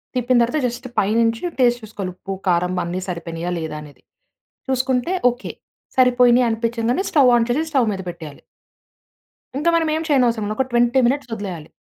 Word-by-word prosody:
తిప్పిన 250 0 +2
తరువాత 245 +6 +1
జస్ట్ 245 +2 -4
పైనుంచి 225 +3 +1 0.2
టేస్ట్ 240 -1 +3
చూసుకోవాలి. 205 -3 -6
ఉప్పు, 195 +1 -6
కారం 180 0 +1
అన్ని 175 +2 -3
సరిపోయినాయా 170 -1 -4
లేదా 160 -2 -5
అనేది. 150 -1 -14 0.7
చూసుకుంటే 260 +3 0 0.2
ఓకే. 245 +1 -7 0.4
సరిపోయిని 250 -1 +5
అనిపించగానే 230 +5 -1
స్టవ్ 275 -5 +5
ఆన్ 230 -1 +2
చేసి 275 +6 +1
స్టవ్ 260 -6 +2
మీద 190 -1 -5
పెట్టేయాలి. 160 -4 -9 1.2
ఇంకా 325 +4 +2
మనం 325 -1 +1
ఏమి 320 +1 -2
చేయనవసరం 240 -7 +2
లేదు. 215 - -2
ఒక 265 - 0
20 240 +2 +3
మినిట్స్ 270 0 -1
వదిలేయాలి. 185 -7 -7
235 Hz, 155 wpm, -20 LUFS, 190-255 Hz, 1.2 s, సరిపోయిని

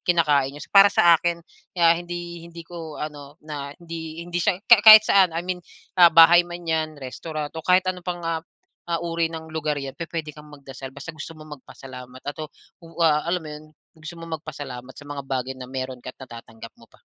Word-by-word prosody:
kinakain 150 -6 +2
ninyo. 145 - -8
Para 200 0 +8
sa 175 -4 +5
akin, 170 -1 -2 0.3
ah, 170 -1 +5
hindi 175 0 -6
hindi 170 0 -11
ko 165 -3 -9
ano 145 -1 -8
na 145 -2 -7
hindi 165 -1 -8
hindi 175 0 -3
siya 175 - +1
ka 235 -3 +7
kahit 215 0 +10
saan 185 -6 +3
I 170 - -3
mean, 180 0 -3 0.4
ah, 175 - +10
bahay 165 +1 +8
man 175 0 -7
'yan, 160 -1 -1
restaurant 145 +3 -6
o 160 - -6
kahit 180 +3 +3
ano 185 -1 -3
pang, 175 -1 -5
ah, 165 -1 -1 0.5
ah, 170 - 0
uri 165 -1 -1
ng 160 -1 -9
lugar 155 -2 -2
'yan 135 -1 -5
pupuwede 165 -1 -6
kang 150 0 -14
magdasal 135 -2 -10
basta 140 +5 -9
gusto 160 +1 -9
mong 155 -2 -11
magpasalamat 130 -1 -12
at 145 0 -5
ah, 155 - -5 0.3
wa 165 -2 +1
alam 180 +1 0
mo - - -8
'yun 150 +1 -10 0.3
gusto 160 +1 -10
mo 165 - -9 0.2
magpasalamat 135 -5 -9
sa - - -12
mga 145 0 -6
bagay 130 -1 -2
na 130 -1 -10
mayro'n 130 -1 -5
ka - - -10
at - - -63
natatanggap 115 -2 -12
mo 115 - -18
pa. - - -23
160 Hz, 210 wpm, -23 LUFS, 145-170 Hz, 0.5 s, kahit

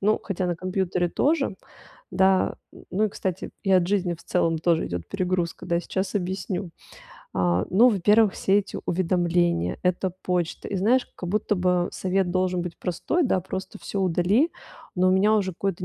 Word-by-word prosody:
Ну, 210 +2 +2
хотя 185 -2 -2
на 175 -1 -1
компьютере 185 -1 -1
тоже, 285 - +1 0.6
да. 190 0 +3 0.2
М, - - -15
ну, 210 +4 +1
и, 215 - +1
кстати, 190 0 -4
и 195 - -1
от 185 -2 +4
жизни 185 -3 0
в 165 - -17
целом 165 -2 +1
тоже 165 0 +1
идёт 85 -1 -5
перегрузка, 185 -3 -2
да. 170 -1 +1
Сейчас 190 +3 -3
объясню. 190 -1 -3 0.6
А, 90 -1 +1
ну, 225 +7 +6
во-первых, 210 0 +4
все 195 +1 +2
эти 195 - -7
уведомления, 175 - +1
это 180 0 0
почта. 175 -2 -2
И 200 - -2
знаешь, 240 +7 +2
как 180 - -6
будто 210 +1 0
бы 180 -1 +1
совет 190 -1 0
должен 185 -1 0
быть 175 -1 -7
простой, 295 - -1
да: 190 - +1
"Просто 190 +3 -6
всё 200 - -4
удали". 190 - +2 0.4
Но 185 0 +3
у - - +4
меня 205 +3 +4
уже 200 -3 +1
какое-то 180 0 -3
185 Hz, 180 wpm, -25 LUFS, 175-195 Hz, 0.6 s, ну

